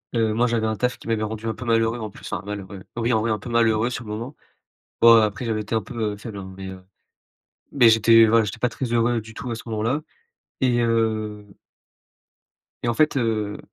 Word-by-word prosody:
Heu, 110 -2 +2
moi 120 +2 +2
j'avais 115 -2 0
un 110 - -1
taf 125 +3 -1
qui - - -14
m'avait 110 -1 0
rendu 110 +1 -5
un 110 - -1
peu 125 - -8
malheureux, 115 0 +1
en 110 -1 -5
plus, - - -11
enfin, - - -3
malheureux, 100 -2 -7
oui 120 +1 0
en 110 - +2
vrai, 115 0 0
un 105 - -1
peu 120 - -9
malheureux 115 -1 +2
sur 120 - -5
le 105 - -7
moment. 120 +7 -6 0.7
Bon, 115 -1 +8
après, 105 +3 -1
j'avais 110 -2 -1
été 105 +2 -3
un 110 - +1
peu, 110 +1 -3
heu, - - -9
faible, 105 0 -8
hein, 95 -1 -8
mais, 95 - -7
heu, 95 -1 -10 0.9
mais 125 -5 +6
j'étais, 115 0 +6
voilà, 115 0 +4
j'étais 105 +3 -5
pas 125 - +1
très 125 +2 -4
heureux 120 0 +2
du 110 +1 -12
tout 125 - -6
à - - -1
ce 115 - -8
moment-là 115 +6 -1 0.6
et 125 -2 +2
heu 110 -3 0 1.4
et - - -1
en - - +1
fait, 155 +6 +2
heu, 110 -4 -1
115 Hz, 230 wpm, -23 LUFS, 110-115 Hz, 1.4 s, Bon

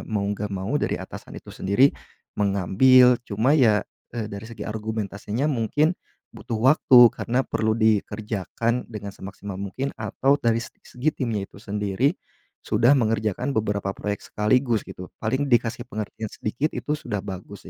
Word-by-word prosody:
mau 105 -2 -2
nggak 105 0 -3
mau 95 +8 -1
dari - - -1
atasan - - -9
itu - - -19
sendiri 100 +9 +2 0.4
mengambil 115 +6 +5
cuma 115 +8 +2
ya, 110 -7 +4 0.3
eee, 115 -3 -4
dari 100 0 -7
segi 115 0 -8
argumentasinya 110 +4 -3
mungkin 150 +7 +1 0.4
butuh 115 -3 -4
waktu 130 +1 +5 0.2
karena 125 +3 -1
perlu 110 0 0
dikerjakan 110 +2 0
dengan 100 -3 -7
semaksimal 95 +1 -8
mungkin 100 +9 -4
atau 125 +6 +1
dari 115 -5 +1
se 115 - -5 0.2
segi 140 +5 -2
timnya 110 -6 -2
itu 100 - -16
sendiri 105 +6 0 0.6
sudah 120 +2 +3
mengerjakan 110 +3 0
beberapa 100 -2 -1
proyek 105 0 -3
sekaligus 115 +1 +1
gitu, 90 - -9 0.2
paling 130 +6 0
dikasih 120 -1 +1
pengertian 110 0 -5
sedikit 130 +8 -2
itu 150 - -3
sudah 105 -8 -4
bagus 100 0 -8
110 Hz, 145 wpm, -24 LUFS, 100-125 Hz, 0.6 s, mengambil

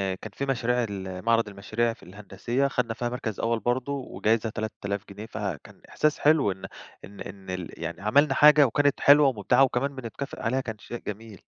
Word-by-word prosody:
كان 100 +3 -10
في 140 - -3
مشاريع 125 -2 0
ال 95 -1 -6
معرَض 115 -1 +3
المشاريع 110 +4 -1
في - - -19
الهندسية 105 +7 -2
خَدنا 125 -4 -1
فيها 120 +1 -3
مركَز 120 -4 -4
أول 115 0 0
برضه 125 +5 -1
وجايزة 115 -4 -1
3000 100 -2 -4
جنيه، 100 +2 -8
فكان 100 -8 -6
إحساس 155 -1 +1
حلو 145 -8 +4
إن 95 0 -8 0.4
إن 100 +1 -14
إن 95 -1 -9
ال 90 -2 -5
يعني 85 +2 -5
عملنا 140 +9 +3
حاجة 150 -1 +7
وكانت 145 +3 +1
حلوة 145 0 +7
ومبدِعة 125 +1 +3
وكمان 135 +2 0
بنتكافئ 130 +2 -7
عليها، 125 +4 0
كان 110 -4 -6
شيء 120 - -7
جميل. 105 -1 -7
115 Hz, 180 wpm, -26 LUFS, 100-130 Hz, 0.4 s, حاجة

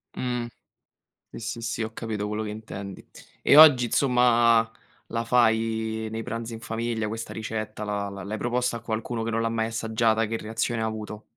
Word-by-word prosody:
Mh. 125 -1 -2 0.8
Sì, - - -9
sì, 115 +1 -5
sì, 115 0 -2
ho 110 - -4
capito 110 -3 -3
quello 105 +1 -2
che 105 - -4
intendi. 100 -2 -8 0.4
E 145 - +5
oggi 145 -6 +9
insomma 120 -3 +4 0.4
la 115 0 -2
fai 110 -2 +1
nei 110 0 -4
pranzi 115 -1 -5
in 115 - -8
famiglia 115 -1 -2
questa 115 +1 -5
ricetta, 110 -1 -4
la 100 -1 -2
la 100 -1 -8
l'hai 105 +3 -4
proposta 120 0 0
a - - -9
qualcuno 115 0 -3
che 115 - -2
non 115 0 0
l'ha 115 - 0
mai 110 -1 0
assaggiata? 115 0 +1
Che 115 +1 -2
reazione 110 +1 -2
ha - - 0
avuto? 110 -1 -5
115 Hz, 185 wpm, -26 LUFS, 110-115 Hz, 0.8 s, oggi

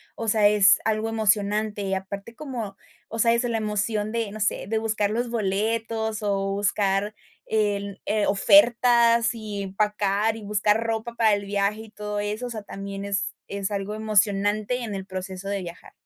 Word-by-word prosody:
o 225 - -5
sea, 210 -1 +5
es 205 -1 +5
algo 220 0 0
emocionante. 210 -1 +1
Y 195 0 -2
aparte, 200 +4 -5
como, 240 -8 -6 0.3
o 225 - -5
sea, 230 +1 +4
es 235 +2 +1
la 235 -2 0
emoción 210 0 -1
de, 230 -3 -2
no 215 - -8
sé, 210 - 0
de 220 +1 0
buscar 215 -2 0
los 240 +2 -1
boletos 220 +1 -1
o 195 -1 0
buscar 200 0 0 0.3
en 200 -2 -1
eh, 210 0 +1
ofertas 235 0 +5
y 210 -2 -5
empacar, 210 +2 0
y - - -9
buscar 210 +2 +2
ropa 225 +1 -3
para 220 -3 +3
el 200 0 -5
viaje 200 +2 0
y 220 - -11
todo 210 -1 -4
eso, 210 +4 -3
o - - -7
sea, 220 -3 -6
también 195 0 -6
es 195 -1 -1 0.2
es 200 -1 -3
algo 200 0 -3
emocionante 215 +2 +1
en 210 -3 -4
el 190 0 -5
proceso 190 0 -6
de 200 -1 -2
viajar. 175 0 -10
210 Hz, 180 wpm, -25 LUFS, 200-225 Hz, 0.3 s, sea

